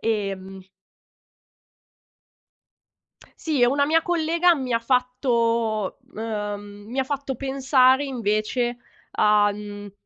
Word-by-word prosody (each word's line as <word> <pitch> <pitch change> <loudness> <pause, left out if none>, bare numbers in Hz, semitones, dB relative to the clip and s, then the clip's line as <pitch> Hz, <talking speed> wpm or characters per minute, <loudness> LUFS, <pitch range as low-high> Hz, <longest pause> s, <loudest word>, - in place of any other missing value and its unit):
Ehm 195 -3 -3 2.8
Sì, 305 -5 -1
e 245 - +6
una 280 +3 +2
mia 320 +3 +3
collega 340 +1 +2
mi 260 -5 -3
ha 230 - +3
fatto, 235 -4 0 0.2
ehm, 205 -2 -5
mi 255 - -6
ha 265 - +2
fatto 275 0 -3
pensare 265 0 +3
invece 240 0 -1 0.3
a, 210 -1 +3
mhmm, 205 -1 -9
240 Hz, 100 wpm, -23 LUFS, 210-270 Hz, 2.8 s, e